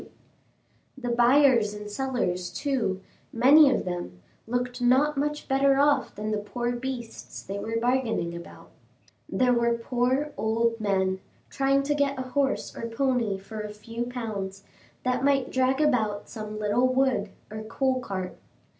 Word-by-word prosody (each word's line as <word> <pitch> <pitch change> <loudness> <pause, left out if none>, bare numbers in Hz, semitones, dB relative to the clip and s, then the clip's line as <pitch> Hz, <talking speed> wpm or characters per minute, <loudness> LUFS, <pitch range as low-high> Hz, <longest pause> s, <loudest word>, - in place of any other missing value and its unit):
The 245 -2 -4
buyers 240 -3 +4
and 210 0 -7
sellers, 205 -7 -2
too, 225 -10 -1 0.3
many 275 +5 +7
of - - 0
them, 175 - -5 0.3
looked 245 +1 -2
not 265 +5 +4
much 295 +2 -2
better 270 0 +3
off 285 +1 +2
than 215 +1 -3
the 215 - 0
poor 240 +4 -3
beasts 245 -1 -6
they 200 +1 -5
were 225 +2 -2
bargaining 235 -8 0
about. 170 - -11 0.6
There 250 -1 +2
were 235 -1 +2
poor 250 +5 0
old 230 +1 +1
men, 190 -2 0 0.3
trying 275 0 +2
to 295 +1 +1
get 285 -1 0
a 260 0 -5
horse 275 +1 -1
or 230 - -4
pony 235 -4 0
for 215 +3 -7
a 210 - -5
few 230 +3 -5
pounds, 200 -6 -5 0.4
that 255 0 0
might 275 -2 +2
drag 260 +1 +2
about 220 -9 +1
some 215 -1 -7
little 215 +4 +2
wood 255 -6 +1 0.2
or 215 0 -5
coal 255 +4 0
cart. 190 -6 -5
240 Hz, 150 wpm, -27 LUFS, 210-265 Hz, 0.6 s, many